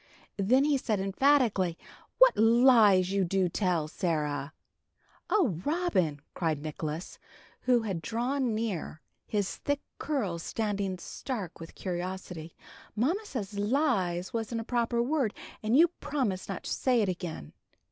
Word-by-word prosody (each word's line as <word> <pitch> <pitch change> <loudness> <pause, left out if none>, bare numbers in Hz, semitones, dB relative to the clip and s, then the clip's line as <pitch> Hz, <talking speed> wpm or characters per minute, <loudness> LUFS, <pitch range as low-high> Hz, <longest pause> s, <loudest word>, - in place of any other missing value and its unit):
Then 250 +8 +4
he 290 -2 +2
said, 215 -5 -1
emphatically, 195 - +2 0.4
"What - - +7
lies 225 -5 +5
you 195 -1 +2
do 185 +1 +1
tell, 175 -4 0
Sarah!" 150 -4 -2 0.8
"Oh, 250 - +2
Robin!" 290 - 0
cried 160 -4 -1
Nicholas, 155 +2 -5 0.5
who 245 -2 +5
had 190 -6 -3
drawn 240 - -1
near, 210 -8 -3 0.3
his 205 -2 -1
thick 285 0 -1 0.2
curls 210 - -2
standing 200 -2 -2
stark 195 - -6
with 165 - -10
curiosity, 180 -2 -5 0.4
"Mamma 310 - +1
said 215 - -5
'lies' 200 - 0
wasn't 230 0 -2
a - - -5
proper 235 0 0
word, 265 -5 0 0.3
and 220 +4 +2
you 335 +2 +7
promised 215 -12 -2
not 195 - -4
to - - -5
say 250 -4 +2
it - - 0
again." 170 - -5
205 Hz, 135 wpm, -29 LUFS, 180-250 Hz, 0.8 s, What